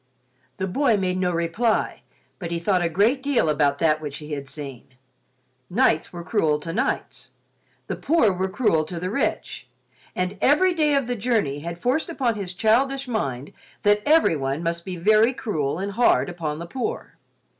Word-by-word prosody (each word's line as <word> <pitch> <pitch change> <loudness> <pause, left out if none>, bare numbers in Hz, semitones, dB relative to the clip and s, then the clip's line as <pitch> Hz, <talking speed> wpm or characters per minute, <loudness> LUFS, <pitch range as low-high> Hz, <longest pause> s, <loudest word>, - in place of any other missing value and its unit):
The 190 - -1
boy 230 +4 +2
made 185 -1 -1
no 180 -1 +1
reply, 170 +7 0 0.4
but 175 -4 -5
he 170 - -2
thought 180 +2 +1
a 170 - +1
great 215 - +2
deal 270 - +1
about 145 -2 +2
that 155 -1 +2
which 145 -2 -5
he 150 0 -9
had 140 -2 -5
seen. 135 -3 -9 0.7
Knights 185 -6 +2
were 175 -1 -7
cruel 160 -6 +1
to 165 +2 -5
knights—the 260 +5 -5
poor 280 - +3
were 190 +1 -2
cruel 185 -7 +2
to 170 +1 -6
the 180 +2 -3
rich—and 190 -5 -4
every 360 +7 +4
day 305 -3 +2
of 275 -2 +1
the 245 +1 -2
journey 210 - 0
had 170 +3 -6
forced 260 - 0
upon 260 -8 0
his 195 -4 -6
childish 265 +6 +2
mind 140 - -3 0.3
that 205 0 +4
everyone 160 - +2
must 170 0 -2
be 185 -1 -5
very 215 +7 +4
cruel 155 - -2
and 195 +2 -3
hard 230 -2 +3
upon 160 -4 -4
the 170 - -6
poor. 265 - -5
185 Hz, 170 wpm, -23 LUFS, 165-245 Hz, 0.7 s, every